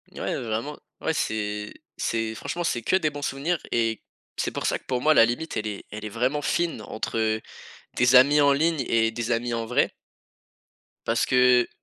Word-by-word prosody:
Ouais, - - -2
vraiment. 115 +5 -3 0.2
Ouais, 160 - 0
c'est 105 -6 -2 0.2
c'est 115 -1 -1
franchement, 175 +9 -4
c'est 120 -8 -1
que 150 - +1
des 160 -5 +2
bons 145 -1 -8
souvenirs 145 +4 -1
et 115 -1 0 0.4
c'est - - -1
pour - - -4
ça - - +1
que, - - -31
pour 125 -1 -1
moi, 155 +3 +5
la 115 - +7
limite, 120 +8 -3
elle 110 - -2
est 105 -2 -6
elle 105 +1 -6
est - - -4
vraiment 125 +7 0
fine 170 - -1
entre 110 0 -2 0.5
tes 125 +1 +3
amis 140 +4 +6
en 140 -1 +5
ligne 155 0 +1
et 115 -1 +3
des 115 0 -4
amis 120 0 0
en 115 0 -2
vrai 125 - +1 1.2
parce - - +2
que 125 -1 +4
120 Hz, 195 wpm, -25 LUFS, 110-145 Hz, 1.2 s, la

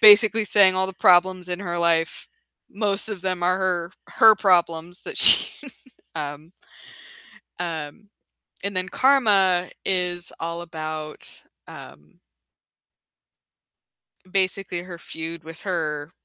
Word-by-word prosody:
basically 215 +1 +7
saying 195 -2 +4
all 190 0 +1
the 190 - -5
problems 180 0 +3
in 180 +1 -4
her 175 -3 -4
life, 170 - 0 0.4
most 205 0 -2
of 210 -4 -6
them 185 -2 -3
are 180 +1 +2
her 180 -2 -2 0.2
her 220 -1 +6
problems 175 -4 0
that - - -8
she 295 - +5 0.5
um 150 +3 -7 1.1
um, 170 +4 -6 0.5
and 200 0 -4
then 185 0 -3
"Karma" 200 -10 +3 0.2
is 180 -2 -2
all 170 +1 -5
about, 155 -2 -8 0.2
um 75 +2 -14 2.1
basically 185 -1 -1
her 175 -1 -10
feud 165 0 -8
with 165 0 -11
her 155 -5 -3
180 Hz, 115 wpm, -23 LUFS, 165-195 Hz, 2.1 s, basically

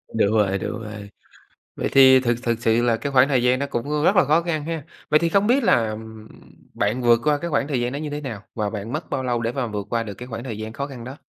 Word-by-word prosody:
Đúng 110 -2 +2
rồi, 100 -2 +2
đúng 115 - -5
rồi. 105 -1 -8 0.7
Vậy - - -2
thì 130 -1 +7
thực 120 -2 +1
thực 115 -1 0
sự 115 0 +2
là 115 -2 +2
cái 140 +3 -4
khoảng 130 0 +5
thời 130 -4 +1
gian 125 +1 +3
đó 140 - -1
cũng 145 +5 -2
rất 195 - +4
là 180 - +6
khó 155 +4 +3
khăn 160 -3 -3
ha. 160 -3 -4 0.3
Vậy 150 - +5
thì 170 - +1
không 200 +4 +2
biết 260 +2 +3
là, 120 - +3
ừm, 110 0 -9 0.5
bạn 110 +5 -1
vượt 120 -1 +4
qua 150 -1 +2
cái 170 +3 -5
khoảng 145 -2 0
thời 135 -5 -1
gian 120 - -1
đó - - -3
như 150 0 -4
thế 145 +1 -5
nào 115 -8 -6
và 105 -2 -1
bạn 105 +3 -6
mất - - -4
bao 130 - -2
lâu 120 -2 -1
để 115 0 -1
mà 125 -1 -2
vượt 105 -2 -5
qua 115 -1 0
được 105 -3 -7
cái 125 +4 -10
khoảng 115 -1 -6
thời 115 -5 -6
gian 110 +1 -6
khó 140 +2 -4
khăn 130 -4 -9
đó? 130 +4 -8
125 Hz, 290 wpm, -22 LUFS, 110-145 Hz, 0.7 s, thì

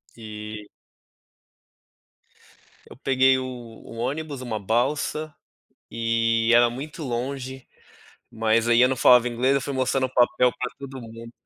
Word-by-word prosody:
E 105 -2 -8 2.2
Eu - - -13
peguei 130 -1 +3
o 130 - -3
o 120 -2 -10
ônibus, 140 +3 -4
uma 110 -4 -4
balsa 140 +8 -1 0.6
e 115 0 +1
era 120 0 +6
muito 145 +6 -7
longe, 130 +1 -5 0.6
mas 115 +1 +1
aí 120 +1 +5
eu 125 - +5
não 130 - 0
falava 125 0 +6
inglês. 125 +3 +1
Eu 140 - +1
fui 140 - -4
mostrando 130 0 +1
o 130 - -19
papel 125 0 +3
pra 125 - -3
todo 135 -2 -8
mundo. 115 +1 -11
125 Hz, 135 wpm, -24 LUFS, 115-130 Hz, 2.2 s, era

